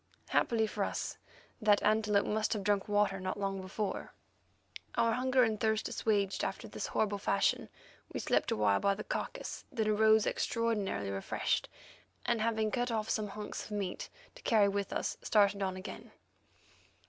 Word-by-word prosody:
Happily 225 Hz, -2 st, +2 dB
for 210 Hz, -1 st, -2 dB
us -, -, -3 dB, 0.4 s
that 210 Hz, -1 st, +4 dB
antelope 210 Hz, -1 st, +3 dB
must 215 Hz, 0 st, 0 dB
have 210 Hz, -3 st, -3 dB
drunk 200 Hz, -1 st, +1 dB
water 205 Hz, -2 st, +2 dB
not 185 Hz, +2 st, -3 dB
long 195 Hz, -1 st, -2 dB
before. 195 Hz, +2 st, -4 dB, 0.8 s
Our 230 Hz, -, +3 dB
hunger 255 Hz, +1 st, +3 dB
and 220 Hz, -2 st, +1 dB
thirst 220 Hz, -1 st, +1 dB
assuaged 200 Hz, -3 st, 0 dB
after -, -, -3 dB
this -, -, -4 dB
horrible 205 Hz, -2 st, 0 dB
fashion, -, -, +1 dB, 0.4 s
we -, -, -3 dB
slept -, -, +1 dB
awhile 100 Hz, -2 st, +3 dB
by 200 Hz, 0 st, +2 dB
the 215 Hz, -, -6 dB
carcase, -, -, -4 dB
then 225 Hz, -4 st, 0 dB
arose 220 Hz, 0 st, +5 dB
extraordinarily 205 Hz, -, -1 dB
refreshed, 95 Hz, 0 st, -1 dB, 0.6 s
and, 235 Hz, -2 st, +1 dB
having 220 Hz, -1 st, +1 dB
cut 245 Hz, +1 st, 0 dB
off 220 Hz, -2 st, -1 dB
some 215 Hz, -1 st, 0 dB
hunks 210 Hz, +1 st, -6 dB
of -, -, -12 dB
meat 190 Hz, -3 st, -4 dB, 0.2 s
to -, -, -14 dB
carry 215 Hz, -3 st, +4 dB
with 200 Hz, 0 st, -2 dB
us, -, -, -2 dB
started 200 Hz, -1 st, +3 dB
on 190 Hz, -1 st, -1 dB
again. 185 Hz, -, -8 dB
210 Hz, 160 wpm, -33 LUFS, 200-220 Hz, 0.8 s, arose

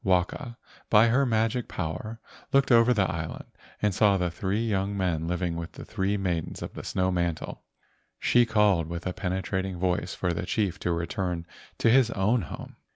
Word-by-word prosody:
Waka, 95 Hz, +6 st, 0 dB, 0.3 s
by 110 Hz, +2 st, +6 dB
her 135 Hz, +3 st, +3 dB
magic 115 Hz, +1 st, +1 dB
power, 110 Hz, +8 st, -4 dB, 0.3 s
looked 135 Hz, -1 st, +3 dB
over 115 Hz, +1 st, +6 dB
the 105 Hz, -5 st, +3 dB
island 80 Hz, -1 st, -5 dB, 0.4 s
and 105 Hz, -2 st, +3 dB
saw 100 Hz, 0 st, +4 dB
the 90 Hz, -2 st, -1 dB
three 100 Hz, +6 st, -1 dB
young 100 Hz, -1 st, 0 dB
men 85 Hz, -4 st, 0 dB
living 90 Hz, -1 st, -1 dB
with 85 Hz, 0 st, -6 dB
the -, -, -9 dB
three 100 Hz, -1 st, -1 dB
maidens 90 Hz, -4 st, -2 dB
of -, -, -7 dB
the -, -, -7 dB
snow 95 Hz, 0 st, 0 dB
mantle. 85 Hz, -3 st, -2 dB, 0.6 s
She 120 Hz, -, +4 dB
called 105 Hz, -7 st, +3 dB
with 85 Hz, 0 st, -5 dB
a 90 Hz, -, -1 dB
penetrating 95 Hz, 0 st, -2 dB
voice 90 Hz, 0 st, -1 dB
for 90 Hz, -, -1 dB
the 85 Hz, -, -4 dB
chief 100 Hz, -3 st, 0 dB
to 90 Hz, -, -1 dB
return 85 Hz, 0 st, -2 dB, 0.3 s
to 115 Hz, -, +3 dB
his 125 Hz, -1 st, +5 dB
own 110 Hz, +3 st, +1 dB
home. 80 Hz, -, -8 dB
95 Hz, 180 wpm, -27 LUFS, 85-110 Hz, 0.6 s, by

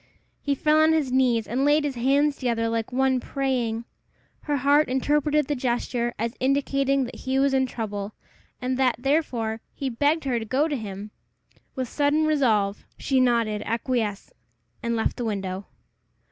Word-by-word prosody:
He 285 Hz, -1 st, 0 dB
fell 305 Hz, +3 st, +3 dB
on 315 Hz, +1 st, +5 dB
his 300 Hz, -5 st, 0 dB
knees 250 Hz, -4 st, +2 dB
and 250 Hz, +4 st, 0 dB
laid 295 Hz, +1 st, +4 dB
his 290 Hz, -2 st, -1 dB
hands 275 Hz, +4 st, +2 dB
together 235 Hz, -3 st, 0 dB
like 225 Hz, 0 st, -2 dB
one 260 Hz, 0 st, +2 dB
praying. 245 Hz, -4 st, -2 dB, 0.6 s
Her 290 Hz, -1 st, 0 dB
heart 285 Hz, +2 st, +3 dB
interpreted 295 Hz, +3 st, +1 dB
the 290 Hz, -, -1 dB
gesture 240 Hz, -1 st, -1 dB
as 230 Hz, +2 st, -2 dB
indicating 275 Hz, 0 st, +1 dB
that 245 Hz, -, -7 dB
he 260 Hz, +1 st, -2 dB
was 275 Hz, 0 st, +3 dB
in 265 Hz, -1 st, +2 dB
trouble, 205 Hz, -4 st, -5 dB, 0.5 s
and 255 Hz, 0 st, -2 dB
that, 255 Hz, -2 st, +3 dB
therefore, 245 Hz, -5 st, -1 dB
he 270 Hz, -2 st, -3 dB
begged 290 Hz, +7 st, +1 dB
her 255 Hz, -4 st, 0 dB
to -, -, -5 dB
go 270 Hz, +7 st, +1 dB
to 300 Hz, -, -2 dB
him. 210 Hz, -3 st, -6 dB, 0.6 s
With 260 Hz, -2 st, -2 dB
sudden 295 Hz, +4 st, +1 dB
resolve 220 Hz, -10 st, +1 dB
she 265 Hz, -1 st, +1 dB
nodded 230 Hz, -4 st, +2 dB
acquiescence, 230 Hz, -3 st, -2 dB, 0.5 s
and 235 Hz, -2 st, -1 dB
left 225 Hz, -, -1 dB
the 245 Hz, -, -3 dB
window. 195 Hz, -2 st, -3 dB
255 Hz, 165 wpm, -25 LUFS, 230-280 Hz, 0.6 s, on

